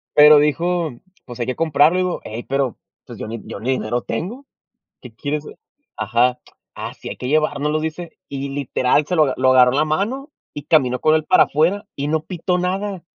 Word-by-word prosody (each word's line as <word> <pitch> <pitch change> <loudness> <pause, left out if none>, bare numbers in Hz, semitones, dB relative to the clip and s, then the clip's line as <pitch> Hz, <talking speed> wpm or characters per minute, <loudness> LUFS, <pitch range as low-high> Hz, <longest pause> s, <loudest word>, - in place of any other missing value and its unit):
Pero 150 0 +9
dijo: 165 +3 0 0.3
"Pues 120 -1 -10
hay 120 - -1
que 130 - -3
comprarlo", 165 +3 +2
"Hey, 115 +2 -6
pero, 135 -3 -1 0.3
pues - - -10
yo - - -5
ni 115 +1 -6
yo - - -7
ni 120 - -3
dinero 120 -1 -1
tengo". 185 - -5 0.6
"Qué 125 -3 -12
quieres 145 +6 -4
ah" - - -10 0.4
ajá. 120 +3 +1 0.4
"Ah, - - -6
sí - - -9
hay - - -7
que 125 - -5
llevárnoslo", 150 +1 +1
dice, 160 +2 -6
y 140 0 -4
literal 135 0 +1
se 180 - -2
lo 150 -5 +3
lo 130 0 +3
agarró 125 -1 +6
en - - 0
la 150 - +3
mano 225 - -2 0.2
y 145 - -6
caminó 130 -5 +2
con 155 - +4
él 155 -1 0
para - - +6
afuera 170 +8 0
y 140 +1 -3
no 155 +1 0
pitó 180 0 -2
nada. 190 +1 -2
150 Hz, 200 wpm, -20 LUFS, 130-170 Hz, 0.6 s, Pero